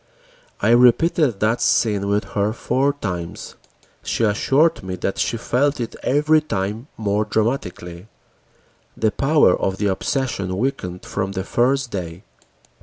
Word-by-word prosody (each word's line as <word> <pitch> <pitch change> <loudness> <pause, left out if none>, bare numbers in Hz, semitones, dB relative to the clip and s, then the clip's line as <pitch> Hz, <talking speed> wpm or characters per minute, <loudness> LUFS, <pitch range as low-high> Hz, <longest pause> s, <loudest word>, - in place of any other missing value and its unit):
I - - +3
repeated 125 - +4
that 110 +3 +1
scene 105 -3 +2
with 100 +1 +1
her 105 +1 0
four 135 +4 0
times. 90 -11 -5 0.5
She - - -1
assured 135 +10 +2
me 95 0 -5
that 95 +2 -3
she 115 - 0
felt 135 +5 0
it 115 - -4
every 150 +3 +3
time 105 -2 -3
more 105 -1 0
dramatically. 105 -5 -3 0.9
The 110 -1 +1
power 140 - +3
of 95 0 -2
the 105 - -2
obsession 100 -2 -1
weakened 100 -7 -3
from 95 -1 -3
the 95 -1 -3
first 125 +4 0
day. 90 -1 -6
110 Hz, 135 wpm, -21 LUFS, 95-135 Hz, 0.9 s, repeated